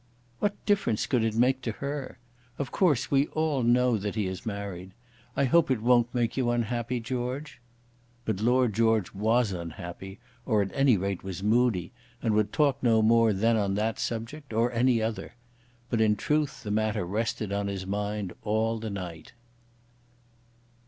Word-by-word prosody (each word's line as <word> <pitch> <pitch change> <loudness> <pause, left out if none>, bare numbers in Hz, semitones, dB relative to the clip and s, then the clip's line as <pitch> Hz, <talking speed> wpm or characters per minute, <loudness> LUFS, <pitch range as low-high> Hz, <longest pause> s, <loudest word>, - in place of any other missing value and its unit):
"What 205 -1 -2
difference 200 - +1
could 125 -4 +1
it 110 -1 0
make 130 +3 +3
to 115 -3 -3
her? 140 +1 -5 0.4
Of 140 -3 -4
course 145 -8 +2
we 140 +1 +3
all 155 -4 0
know 120 -1 +3
that 105 +1 -4
he 105 -3 0
is 95 +3 -5
married. 100 -3 -5 0.4
I - - +3
hope 165 +5 +4
it 130 -4 +1
won't 120 +1 +3
make 120 -2 0
you 130 -3 +1
unhappy, 120 +1 -1
George." 125 +3 -4 0.6
But 110 -4 -1
Lord 120 +1 +2
George 110 -2 +2
was 110 +2 +2
unhappy, 90 +3 -7 0.2
or 110 -5 +2
at 95 - -6
any 135 -5 +4
rate, 95 0 -3
was 95 -1 -6
moody, 110 -4 +2 0.3
and 115 -3 0
would 105 -1 +1
talk 140 -3 +2
no 115 -3 +3
more 115 0 +5
then 115 +4 +2
on 100 -2 0
that 110 +2 -1
subject, 115 +4 -4
or 115 +2 +2
any 120 -1 +2
other. 115 +1 -4 0.6
But 115 -2 +1
in 105 -1 +4
truth 150 +4 -1
the 105 - -4
matter 110 -3 0
rested 105 +1 -2
on 100 0 -1
his 95 -1 -4
mind 100 -1 -3
all 110 +1 0
the 110 0 -4
night. 90 -4 -7
115 Hz, 170 wpm, -28 LUFS, 105-125 Hz, 0.6 s, more